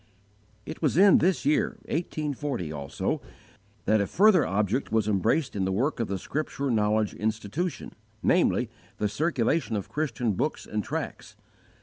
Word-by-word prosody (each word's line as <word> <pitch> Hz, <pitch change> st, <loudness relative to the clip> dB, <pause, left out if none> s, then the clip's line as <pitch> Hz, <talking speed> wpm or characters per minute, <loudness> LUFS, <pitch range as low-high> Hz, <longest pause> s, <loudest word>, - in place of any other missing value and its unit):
It 155 Hz, -, -7 dB
was 150 Hz, -2 st, +1 dB
in 195 Hz, +1 st, +7 dB
this 180 Hz, -4 st, +1 dB
year 150 Hz, +2 st, +2 dB
1840, 145 Hz, -, -3 dB
also, 70 Hz, -2 st, -3 dB, 0.6 s
that 110 Hz, 0 st, +3 dB
a 100 Hz, -, 0 dB
further 195 Hz, -2 st, +5 dB
object 105 Hz, +6 st, 0 dB
was 110 Hz, -2 st, +2 dB
embraced 105 Hz, -, +1 dB
in 100 Hz, -, 0 dB
the 95 Hz, -, 0 dB
work 125 Hz, +11 st, 0 dB
of 115 Hz, -, 0 dB
the 100 Hz, -, -2 dB
Scripture 140 Hz, -, -3 dB
Knowledge 105 Hz, -1 st, +1 dB
Institution, 110 Hz, -, -3 dB, 0.3 s
namely, 125 Hz, -9 st, +2 dB, 0.3 s
the 105 Hz, -, 0 dB
circulation 135 Hz, +2 st, 0 dB
of 100 Hz, -, -4 dB
Christian 125 Hz, -7 st, -1 dB
books 150 Hz, +11 st, -2 dB
and 105 Hz, -1 st, -3 dB
tracts. 145 Hz, -6 st, -5 dB
120 Hz, 145 wpm, -27 LUFS, 105-155 Hz, 0.6 s, in